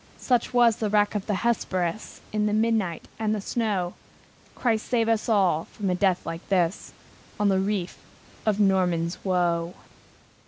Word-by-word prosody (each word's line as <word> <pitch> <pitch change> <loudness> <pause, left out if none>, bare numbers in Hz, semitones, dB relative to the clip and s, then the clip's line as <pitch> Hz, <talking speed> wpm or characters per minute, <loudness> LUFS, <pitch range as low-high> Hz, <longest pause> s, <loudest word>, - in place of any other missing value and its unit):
Such 245 -3 +1
was 240 -2 +4
the 215 -3 -1
wreck 205 0 +2
of 205 -2 -3
the 210 - 0
Hesperus, 185 -4 -1
In 210 0 +1
the 210 - 0
midnight 215 -6 0
and 215 -1 0
the - - -3
snow! 200 -4 -1 0.6
Christ 225 -3 0
save 230 -2 +1
us 225 0 0
all 190 -7 +2
from 195 -3 -3
a - - +2
death 185 -1 +1
like 165 +1 -6
this, 180 -1 0 0.5
On 205 -1 +3
the 190 -1 +2
reef 190 -2 -2 0.4
of 215 -2 +1
Norman's 180 -4 +1
Woe! 175 -2 0
200 Hz, 160 wpm, -25 LUFS, 180-220 Hz, 0.6 s, was